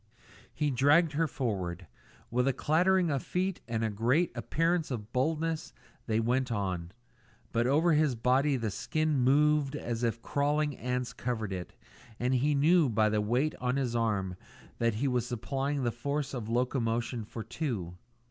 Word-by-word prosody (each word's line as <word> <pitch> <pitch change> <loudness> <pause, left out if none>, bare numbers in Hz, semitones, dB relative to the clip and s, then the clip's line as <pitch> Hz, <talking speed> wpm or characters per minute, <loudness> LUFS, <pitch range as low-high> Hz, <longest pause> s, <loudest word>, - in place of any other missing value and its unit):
He 150 -1 -1
dragged 145 +6 +4
her 160 +3 +1
forward. 95 - -3 0.5
With 125 +2 +1
a 135 - +3
clattering 175 +5 +2
of 140 -2 0
feet 185 +1 -2
and 115 -1 -1
a 110 - 0
great 125 - +2
appearance 165 0 0
of 115 -4 -5
boldness 160 +4 -1 0.3
they 110 -1 +1
went 125 +3 0
on, 90 -5 -2 0.6
but 115 +1 +1
over 155 +5 +3
his 150 -4 +3
body 130 +4 +2
the 115 -3 -2
skin 155 +8 0
moved 145 +2 +3
as 120 -5 -3
if 115 -1 -1
crawling 145 0 0
ants 125 +1 -3
covered 110 -5 -3
it, 90 -1 -6 0.5
and 125 +2 +1
he 140 +4 +2
knew 155 +1 +4
by 110 -1 +3
the 105 0 +1
weight 125 +8 +1
on 125 +1 0
his 130 -4 -1
arm 105 -5 0 0.4
that 115 -2 +1
he 135 +6 0
was 125 -2 0
supplying 135 +4 -2
the 120 - +1
force 140 +4 -3
of 115 -4 -4
locomotion 120 -1 0
for 110 +1 -7
two. 110 - -4
125 Hz, 165 wpm, -30 LUFS, 115-150 Hz, 0.6 s, dragged